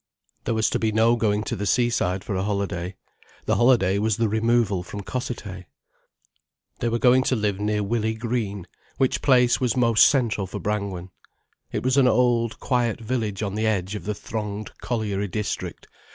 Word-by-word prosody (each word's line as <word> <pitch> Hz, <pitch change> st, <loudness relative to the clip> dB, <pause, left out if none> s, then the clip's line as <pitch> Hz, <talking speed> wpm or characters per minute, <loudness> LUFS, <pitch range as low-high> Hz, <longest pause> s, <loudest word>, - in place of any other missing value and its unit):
There 115 Hz, -, 0 dB
was 110 Hz, 0 st, +2 dB
to -, -, 0 dB
be 110 Hz, -1 st, +1 dB
no 115 Hz, +2 st, +4 dB
going 105 Hz, -2 st, 0 dB
to -, -, -3 dB
the 105 Hz, +1 st, -3 dB
seaside 100 Hz, -6 st, +1 dB
for -, -, -4 dB
a 95 Hz, -, 0 dB
holiday. 100 Hz, -3 st, -2 dB, 0.5 s
The -, -, +1 dB
holiday 115 Hz, -6 st, +3 dB
was 110 Hz, -1 st, +1 dB
the 115 Hz, -, +2 dB
removal 110 Hz, -3 st, +1 dB
from 100 Hz, +3 st, -7 dB
Cossethay. 100 Hz, -4 st, -5 dB, 1.1 s
They 120 Hz, -, 0 dB
were 115 Hz, -, 0 dB
going 125 Hz, +1 st, +5 dB
to 130 Hz, -, +2 dB
live 105 Hz, -3 st, -1 dB
near 105 Hz, 0 st, 0 dB
Willey 110 Hz, +1 st, -1 dB
Green, 110 Hz, -5 st, -3 dB, 0.3 s
which 130 Hz, -1 st, +1 dB
place 125 Hz, -3 st, +4 dB
was 125 Hz, -1 st, +1 dB
most 115 Hz, -3 st, +6 dB
central 115 Hz, -8 st, 0 dB
for -, -, -6 dB
Brangwen. 100 Hz, -4 st, -3 dB, 0.6 s
It -, -, -3 dB
was 130 Hz, +2 st, +1 dB
an 135 Hz, -2 st, +5 dB
old, 120 Hz, -2 st, +2 dB
quiet 120 Hz, -4 st, 0 dB
village 110 Hz, -3 st, -2 dB
on 100 Hz, -2 st, -3 dB
the 110 Hz, +1 st, 0 dB
edge 95 Hz, -2 st, -1 dB
of 105 Hz, -, -6 dB
the 105 Hz, 0 st, -2 dB
thronged 105 Hz, 0 st, -5 dB
colliery 105 Hz, -4 st, -2 dB
district. 105 Hz, +2 st, -4 dB
110 Hz, 180 wpm, -24 LUFS, 100-120 Hz, 1.1 s, most